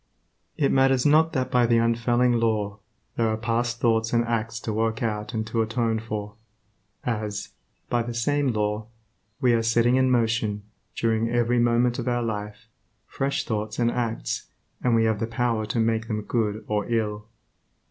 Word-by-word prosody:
It 140 - +2
matters 135 -1 +3
not 155 +2 +5
that 130 -1 -1
by 125 -1 +4
the 115 0 +4
unfailing 120 +1 +2
Law, 110 -2 0 0.4
there 115 - +2
are 110 0 0
past 120 +1 -1
thoughts 115 -1 +1
and 120 0 +3
acts 115 -1 -2
to 110 - -3
work 110 +1 -1
out 105 0 -2
and 110 0 -1
to 115 +1 -1
atone 115 0 0
for, 105 -2 -5 0.7
as, 105 -4 -3 0.4
by 120 - +1
the 120 0 -5
same 145 +4 +1
law, 105 -2 -1 0.5
we 125 -2 +4
are 115 - +3
setting 115 +2 +3
in 130 0 +3
motion, 115 -4 +1 0.3
during 115 0 +1
every 120 0 +2
moment 120 +1 +2
of 120 - -4
our 120 -1 +1
life, 105 -1 -5 0.4
fresh 135 +5 -2
thoughts 110 -1 -3
and 120 -1 +2
acts, 115 -2 -3 0.4
and 120 -2 +3
we 115 - +3
have 110 -2 +1
the 115 - -1
power 115 -2 -1
to 110 +3 -1
make 115 0 +1
them 105 -1 -2
good 110 -2 -1
or 105 -1 -1
ill. 105 -2 -1
115 Hz, 175 wpm, -25 LUFS, 110-120 Hz, 0.7 s, not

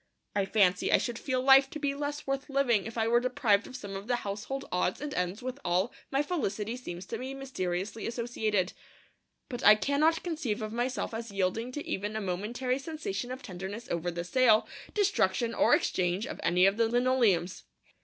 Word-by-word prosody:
I 200 -1 +2
fancy 195 -3 +3
I - - +7
should 240 -2 -3
feel 255 -2 -1
life 270 0 +7
to 310 - -6
be 285 -2 -1
less 290 +1 -4
worth 275 +1 -2
living 250 -7 +2
if 225 - -8
I 225 0 +1
were 235 +1 +4
deprived 245 -5 +2
of 255 - -10
some 200 -6 -6
of 195 +2 -7
the 245 - +2
household 225 +5 -4
odds 180 0 0
and 295 0 -5
ends 180 +6 -2
with 255 +1 -4
which - - -20
all 180 +6 +1 0.2
my 275 +1 +1
felicity 230 - -2
seems 185 -8 -7
to - - -5
be 265 +1 -5
mysteriously 215 -6 -3
associated. 220 -5 -1 0.7
But 245 -3 -6
I 210 - +9
cannot 285 +9 +2
conceive 300 -12 -2
of 215 0 -4
myself 245 +1 -2
as 230 +1 -5
yielding 200 +5 -1
to 295 - -5
even 205 +2 -3
a - - 0
momentary 220 +7 -2
sensation 270 -7 -4
of 260 +2 -6
tenderness 190 +4 -6
over 170 +1 -1
the 170 0 -4
sale, 220 +3 +4 0.3
destruction, 230 - +2
or - - +5
exchange 180 +3 0
of - - -7
any 180 +2 +4
of 195 +2 +3
the 230 -1 +3
linoleums. 235 -8 +2
230 Hz, 195 wpm, -30 LUFS, 195-265 Hz, 0.7 s, I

